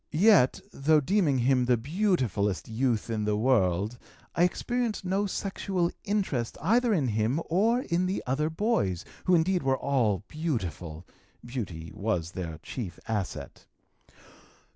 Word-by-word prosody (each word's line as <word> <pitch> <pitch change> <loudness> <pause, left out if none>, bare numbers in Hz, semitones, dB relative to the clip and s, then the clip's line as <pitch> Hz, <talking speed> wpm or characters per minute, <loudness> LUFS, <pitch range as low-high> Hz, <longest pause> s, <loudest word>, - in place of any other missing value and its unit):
Yet, 185 - +4
though 155 +3 +3
deeming 160 -2 +2
him 125 0 +3
the 125 -1 +3
beautifulest 125 - 0
youth 115 -1 0
in 110 -1 -1
the 105 0 +1
world, 105 -2 +1 0.3
I - - 0
experienced 235 +2 -2
no 195 +3 +1
sexual 190 -2 -1
interest 195 - -1
either 230 - +3
in 150 - +2
him 110 +7 +1
or 225 +8 +3
in 180 -4 0
the 190 - -2
other 145 +5 0
boys, 160 - 0 0.2
who 185 - +5
indeed 175 +2 +2
were 135 -1 +1
all 115 -10 +1
beautiful 90 - -4 0.4
beauty 95 -10 -5
was 90 -6 -2
their 85 -4 -5
chief 100 -9 -6
asset. 105 -4 -4
135 Hz, 135 wpm, -28 LUFS, -, 0.4 s, who